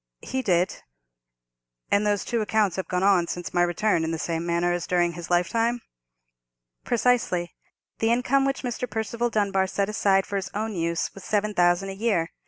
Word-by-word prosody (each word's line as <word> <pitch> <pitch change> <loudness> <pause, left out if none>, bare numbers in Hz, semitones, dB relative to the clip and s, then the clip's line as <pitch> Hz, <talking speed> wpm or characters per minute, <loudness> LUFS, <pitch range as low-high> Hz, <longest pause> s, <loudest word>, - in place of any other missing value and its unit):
"He 260 - -2
did." 180 -6 +1 1.1
"And 205 +1 +3
those 205 -1 0
two 235 -2 -1
accounts 210 -3 +1
have 190 - -3
gone 180 0 -1
on 190 -4 +4
since 175 0 -5
my 175 - +3
return 175 0 +1
in 160 - -1
the 165 - -2
same 165 +1 -3
manner 170 +1 +1
as 175 -1 -3
during 175 -1 +2
his 175 0 -8
lifetime?" 225 +7 +1 1.0
"Precisely. 230 -8 +1 0.5
The 225 - +2
income 250 +3 +2
which 275 0 -1
Mr. 245 0 -3
Percival 230 +2 -2
Dunbar 200 -3 +1
set 200 +1 -1
aside 195 -2 +2
for 200 - -3
his 190 0 -4
own 215 +1 -2
use 170 0 -1
was 195 - -11
seven 210 +1 0
thousand 175 +1 +2
a - - -4
year. 195 -6 0
195 Hz, 185 wpm, -25 LUFS, 175-220 Hz, 1.1 s, on